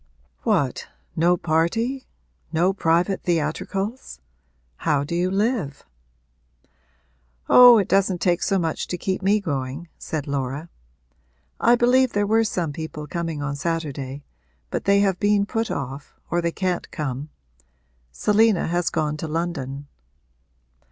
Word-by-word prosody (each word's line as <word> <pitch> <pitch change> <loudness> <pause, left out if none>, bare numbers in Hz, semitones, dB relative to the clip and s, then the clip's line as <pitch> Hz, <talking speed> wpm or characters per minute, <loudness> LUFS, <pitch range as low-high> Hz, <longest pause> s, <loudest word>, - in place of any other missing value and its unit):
'What, - - 0 0.3
no 175 +2 +3
party 200 +12 0 0.4
no 175 +4 +2
private 175 +1 +1
theatricals? 180 - -2 0.6
How 150 -3 +1
do 150 - -5
you 175 +2 +1
live?' 195 - -1 1.6
'Oh, 245 -1 +9
it 200 - +1
doesn't 195 -2 +2
take 175 0 +1
so 195 - +1
much 165 -3 -2
to 180 - -3
keep 190 +1 -2
me 200 +2 +3
going,' 145 -2 -4
said 155 -3 -4
Laura. 140 +2 -3 0.9
'I 235 - +5
believe 250 +1 +3
there 205 0 +1
were 225 +2 +3
some 175 -8 -2
people 155 -1 -6
coming 165 -1 -4
on 145 0 -2
Saturday, 145 -3 -4 0.5
but - - -3
they 200 0 +4
have 195 -3 +1
been 205 -1 +3
put 225 +2 -2
off, 140 +1 -6
or 175 - +1
they 170 0 0
can't 180 0 -2
come. 145 -1 -4 0.8
Selina 210 - +3
has 175 0 0
gone 150 -2 -1
to 160 - -5
London.' 150 -4 -3
170 Hz, 130 wpm, -23 LUFS, 150-200 Hz, 1.6 s, Oh